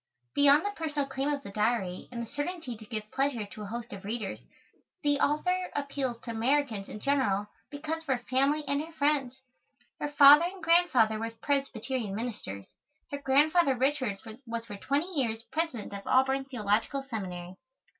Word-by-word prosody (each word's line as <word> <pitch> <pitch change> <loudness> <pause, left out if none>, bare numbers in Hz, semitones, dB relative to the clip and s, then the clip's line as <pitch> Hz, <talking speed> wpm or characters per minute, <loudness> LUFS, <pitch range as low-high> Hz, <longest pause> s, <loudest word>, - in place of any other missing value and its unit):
Beyond 285 +4 +5
the 410 - 0
personal 310 -6 -2
claim 275 +1 -2
of 285 -1 -2
the 200 - -8
Diary 210 -3 0
and 235 -1 -4
the - - -5
certainty 290 +1 -4
to 220 0 -12
give 215 -1 -5
pleasure 270 -5 0
to 205 +1 -10
a 210 - -5
host 235 +3 -6
of 200 0 -8
readers, 215 -1 -3 0.6
the 290 -1 +3
author 360 +6 +1
appeals 280 -4 -2
to 235 - -6
Americans 230 -3 0
in 210 - -7
general 210 -7 +1 0.2
because 310 +3 -4
of 325 - -17
her 250 -3 -1
family 275 +4 +2
and 280 +1 +1
her 320 +2 -8
friends. 285 -4 +1 0.6
Her - - -1
father 290 +2 +8
and 365 0 -6
grandfather 295 -11 +4
were 225 +1 -2
Presbyterian 245 -3 -2
ministers. 205 - -5 0.5
Her 285 - -3
Grandfather 285 +2 +4
Richards 260 -6 0 0.2
was 230 0 -4
for 205 - -7
twenty 290 - -1
years 230 -7 -1
President 315 -11 -2
of 200 0 -7
Auburn 265 +1 +3
Theological 235 +2 0
Seminary. 185 -6 -5
265 Hz, 170 wpm, -29 LUFS, 220-290 Hz, 0.6 s, father